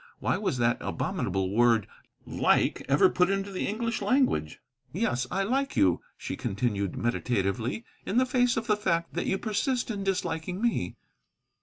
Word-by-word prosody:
Why -, -, 0 dB
was 190 Hz, -8 st, -1 dB
that 120 Hz, -1 st, +2 dB
abominable 95 Hz, 0 st, -2 dB
word 115 Hz, -1 st, +4 dB, 0.4 s
"like" -, -, +2 dB
ever 140 Hz, +7 st, +6 dB
put 180 Hz, 0 st, +2 dB
into 195 Hz, 0 st, -1 dB
the 185 Hz, -, -2 dB
English 230 Hz, +3 st, -2 dB
language? 250 Hz, -, +1 dB, 0.3 s
"Yes, 125 Hz, -, -1 dB
I 195 Hz, +2 st, 0 dB
like 270 Hz, +6 st, -1 dB
you," 90 Hz, -3 st, +3 dB, 0.2 s
she -, -, -5 dB
continued 100 Hz, -2 st, -2 dB
meditatively, 120 Hz, -, -1 dB, 0.2 s
"in 220 Hz, -, -2 dB
the 255 Hz, -, +5 dB
face 245 Hz, -2 st, +2 dB
of 225 Hz, -, -1 dB
the 210 Hz, -, +3 dB
fact 170 Hz, -5 st, 0 dB
that 175 Hz, -, -2 dB
you 190 Hz, -, +1 dB
persist 240 Hz, +4 st, -1 dB
in 200 Hz, -2 st, -4 dB
disliking 180 Hz, -2 st, -2 dB
me." 235 Hz, +1 st, 0 dB
185 Hz, 160 wpm, -28 LUFS, -, 0.4 s, ever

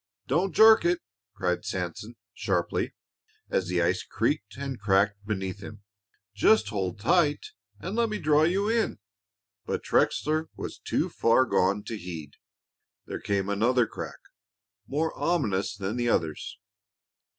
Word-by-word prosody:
"Don't 175 Hz, +8 st, +1 dB
jerk 220 Hz, -2 st, +8 dB
it!" 175 Hz, 0 st, +2 dB, 0.4 s
cried 90 Hz, -1 st, -1 dB
Sanson, 100 Hz, +3 st, -4 dB, 0.2 s
sharply, 90 Hz, -3 st, -1 dB, 0.6 s
as 90 Hz, -, +1 dB
the 90 Hz, -1 st, +1 dB
ice 90 Hz, +1 st, +1 dB
creaked 100 Hz, +6 st, -2 dB
and 135 Hz, -2 st, -5 dB
cracked 100 Hz, 0 st, +2 dB
beneath 95 Hz, -2 st, -3 dB
him. 105 Hz, +1 st, -10 dB, 0.5 s
"Just 110 Hz, 0 st, +4 dB
hold 95 Hz, -3 st, -3 dB
tight 150 Hz, -, +2 dB, 0.3 s
and 190 Hz, +4 st, -5 dB
let 235 Hz, -1 st, +2 dB
me 215 Hz, -, -2 dB
draw 150 Hz, -2 st, +3 dB
you 185 Hz, +6 st, +2 dB
in." 225 Hz, 0 st, +1 dB, 0.7 s
But -, -, -3 dB
Trexler 155 Hz, +1 st, +1 dB
was -, -, -7 dB
too -, -, -1 dB
far 115 Hz, +3 st, +3 dB
gone 100 Hz, -3 st, +1 dB
to 115 Hz, -, -5 dB
heed. 80 Hz, -5 st, -7 dB, 0.7 s
There -, -, -6 dB
came 100 Hz, -1 st, -1 dB
another 115 Hz, +5 st, +2 dB
crack -, -, -7 dB, 0.7 s
more 155 Hz, +5 st, -1 dB
ominous 105 Hz, -, 0 dB
than 100 Hz, +4 st, -3 dB
the 120 Hz, -1 st, +1 dB
others. 80 Hz, -8 st, -1 dB
110 Hz, 140 wpm, -27 LUFS, 95-155 Hz, 0.7 s, jerk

